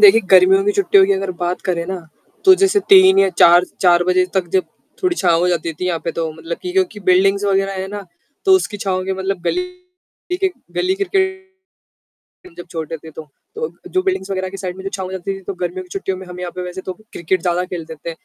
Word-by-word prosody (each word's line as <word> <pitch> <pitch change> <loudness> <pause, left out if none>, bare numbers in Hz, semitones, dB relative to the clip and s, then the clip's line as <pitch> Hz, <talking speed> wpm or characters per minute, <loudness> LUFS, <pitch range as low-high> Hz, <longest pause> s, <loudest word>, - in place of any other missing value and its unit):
देखिए 400 - +8
गर्मियों 190 +1 +6
की 205 - +2
छुट्टियों 200 -1 +4
की 200 - +3
अगर 195 -1 -2
बात 175 +1 -2
करें 170 -2 0
ना, 190 0 -4 0.4
तो 380 -1 +8
जैसे 390 +1 +4
3 380 -1 +7
या 195 - +5
4 175 +1 +7 0.2
4 175 -1 +4
बजे 185 0 +3
तक 185 -2 0
जब 185 - +3 0.4
थोड़ी 360 -2 +1
छाँव 175 -4 +2
हो 180 - +2
जाती 170 -2 -1
थी 180 - -1
यहाँ 175 -2 0
पे 165 - -2
तो 165 -1 -3
मतलब 165 +2 -6
कि 360 - -4
क्योंकि 370 - 0
बिल्डिंग्स 195 +2 +3
वग़ैरह 195 0 +1
है 190 - -4
ना, 205 0 -7 0.4
तो 385 - +5
उसकी 230 - -3
छाँव 190 -2 -2
के 190 - -2
मतलब 190 0 -3
गली 360 - 0 0.7
के 380 0 0 0.3
गली 370 +1 +1
क्रिकेट 380 -1 -1 1.0
हम 365 - -16
जब 175 - -8
छोटे 165 -1 -5
थे 160 +1 -13
तो। 155 0 -10 0.3
तो 465 +1 -3 0.2
जो 370 - +1
बिल्डिंग्स 370 - -2
वग़ैरह 190 -1 -2
की 195 - -8
साइड 185 -2 -5
में 190 - -9
जो 195 - -3
छाँव 190 -1 -4
हो - - -8
जाती 190 +1 -4
थी - - -13
तो 200 - -5
गर्मियों 180 +1 -3
की 180 - -17
छुट्टियों 190 -1 -3
में 190 - -10
हम 180 0 -9
यहाँ 180 - -4
पे 180 - -3
वैसे 180 +1 -6
तो 185 - -2 0.2
क्रिकेट 175 +2 -1
ज़्यादा 175 0 0
खेलते 165 -3 -6
थे। - - -1
190 Hz, 240 wpm, -18 LUFS, 180-205 Hz, 1.0 s, देखिए